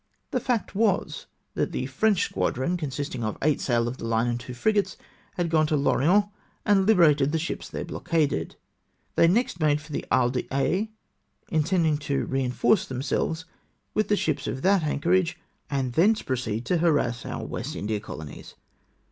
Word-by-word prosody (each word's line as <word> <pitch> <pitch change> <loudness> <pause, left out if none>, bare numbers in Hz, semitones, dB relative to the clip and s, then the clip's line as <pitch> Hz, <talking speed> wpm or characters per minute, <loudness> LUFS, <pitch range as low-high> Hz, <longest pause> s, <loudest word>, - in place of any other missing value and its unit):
The 255 - +1
fact 240 -2 -1
was 205 -1 0 0.3
that - - -1
the 130 - -2
French 195 +9 +2
squadron, 130 +8 -1
consisting 140 -6 -4
of 110 -1 -2
eight 150 0 +2
sail 120 -2 +1
of 120 +2 -4
the - - -6
hue 115 - -1 0.2
and 120 0 -1
two 125 +1 -8
frigates, 205 - +1 0.4
had 175 -2 -1
gone 155 -1 +3
to 150 - +1
L'Orient, 170 +8 +3 0.4
and 200 -2 +3
Hberated 150 -9 +5
the 160 - +1
ships 165 +2 -4
there - - -5
blockaded. 145 - -1 0.6
They 165 - +5
next 200 -1 +1
made 150 -2 +3
for 150 0 -8
Isle 125 -1 +3
d'Aix, 140 - -1 0.6
intending 160 -1 +2
further 145 - -11 0.2
to - - -4
reinforce 130 - +1
themselves 150 +6 -2 0.5
with 215 - +1
tlie 205 - +3
ships 155 -6 -1
at 130 - -4
that 195 -1 +4
anchorage, 175 +4 +1 0.3
and 135 -3 -1
thence 210 - +3
proceed 120 -3 -2
to 180 - +1
harass 145 -8 +1
our - - -5
West - - -5
India 105 +1 -2
colonies. 80 -8 -9
150 Hz, 165 wpm, -26 LUFS, 130-180 Hz, 0.6 s, Hberated